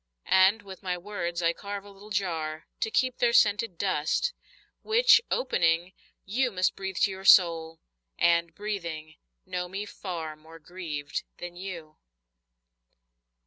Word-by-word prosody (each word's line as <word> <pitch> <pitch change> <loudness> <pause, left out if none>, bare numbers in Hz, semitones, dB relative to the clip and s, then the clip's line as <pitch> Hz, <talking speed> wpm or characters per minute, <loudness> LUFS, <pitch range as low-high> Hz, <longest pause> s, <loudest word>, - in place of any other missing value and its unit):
And 190 +3 +4
with 190 -2 -11
my 180 -2 -2
words 175 -2 -4
I 165 0 +3
carve 200 +2 -6
a 205 - -12
little 200 +2 -14
jar 160 -6 -2
To - - 0
keep 255 +2 0
their 240 -1 +3
scented 210 -4 +3
dust, 190 - 0 0.5
Which, 465 +3 +5
opening, 175 - +1 0.3
you 250 +6 +1
must 185 -4 0
Breathe 190 -1 -5
to 205 - +4
your 190 0 -8
soul, 165 -4 +5 0.4
and, 170 0 +2
breathing, 170 -7 -5 0.3
know 180 0 -3
me 195 +3 -5
far 170 -6 -6
More 160 +2 -15
grieved 160 -3 -5 0.2
than 175 0 -8
you. 175 -4 -8
185 Hz, 140 wpm, -28 LUFS, 165-205 Hz, 0.5 s, Which